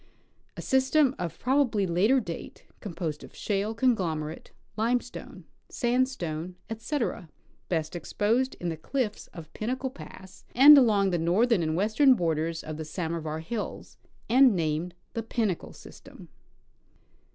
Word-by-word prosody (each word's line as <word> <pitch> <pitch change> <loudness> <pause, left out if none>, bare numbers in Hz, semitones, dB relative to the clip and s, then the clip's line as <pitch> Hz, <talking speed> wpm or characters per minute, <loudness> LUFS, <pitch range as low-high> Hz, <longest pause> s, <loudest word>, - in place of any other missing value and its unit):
A - - -6
system 265 +1 +3
of 175 -2 -4
probably 250 -6 +1
later 195 +10 +3
date, 170 -8 -8
composed 170 -6 -5
of - - -13
shale, 205 +2 -2
con 250 +1 +3
glomerate, 160 -4 -4 0.3
limestone, 240 +3 -3 0.2
sandstone, 235 - -1 0.2
etc., 225 - -3 0.4
best 160 -1 -2
exposed 225 +9 0
in 175 - -2
the 160 - -4
cliffs 220 - -3
of 165 -3 -12
Pinnacle 255 +4 -3
pass 190 -8 -13
and 285 +4 +10
along 210 -8 +4
the 175 - 0
northern 195 +6 +2
and 155 -1 -1
western 225 - +4
borders 165 -3 -1
of 155 -1 -6
the 160 - -4
Samovar 160 -1 -4
hills, 210 +6 -6 0.3
and 255 -2 +5
named 165 +1 -2 0.2
the 230 - -2
Pinnacle 220 -5 -2
system. - - -14
200 Hz, 130 wpm, -27 LUFS, 165-245 Hz, 0.4 s, and